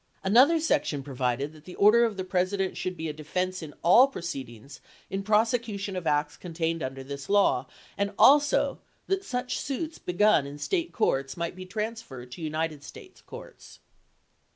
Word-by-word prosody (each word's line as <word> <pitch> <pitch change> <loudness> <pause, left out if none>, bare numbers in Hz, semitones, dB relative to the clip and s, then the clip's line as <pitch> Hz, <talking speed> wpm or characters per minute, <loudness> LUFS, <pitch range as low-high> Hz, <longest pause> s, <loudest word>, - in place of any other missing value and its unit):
Another 255 +12 +5
section 150 - 0
provided 130 +1 -2
that 155 -1 -17
the 180 - -10
order 215 +4 +6
of 220 -4 -3
the 185 - -2
President 185 +1 -1
should 185 -1 -4
be 160 0 -4
a 155 - -4
defense 180 +5 -3
in 155 -2 -9
all 235 +10 +7
proceedings 135 - -8 0.3
in 195 - -2
prosecution 215 -1 0
of 180 -3 -4
acts 150 -1 0
contained 165 -1 -3
under 135 0 -5
this 140 +1 -8
law, 205 0 +3 0.3
and 200 0 0
also 290 +1 +4 0.3
that 390 0 -1
such 250 -6 -3
suits 310 +4 -4
begun 180 -5 +2
in 145 +1 -8
State 340 - -2
courts 135 - 0
might 170 +1 -3
be 185 0 -9
transferred 210 - -6
to 165 - -9
United 155 -1 -3
States - - -13
courts. - - -12
185 Hz, 165 wpm, -27 LUFS, 150-220 Hz, 0.3 s, all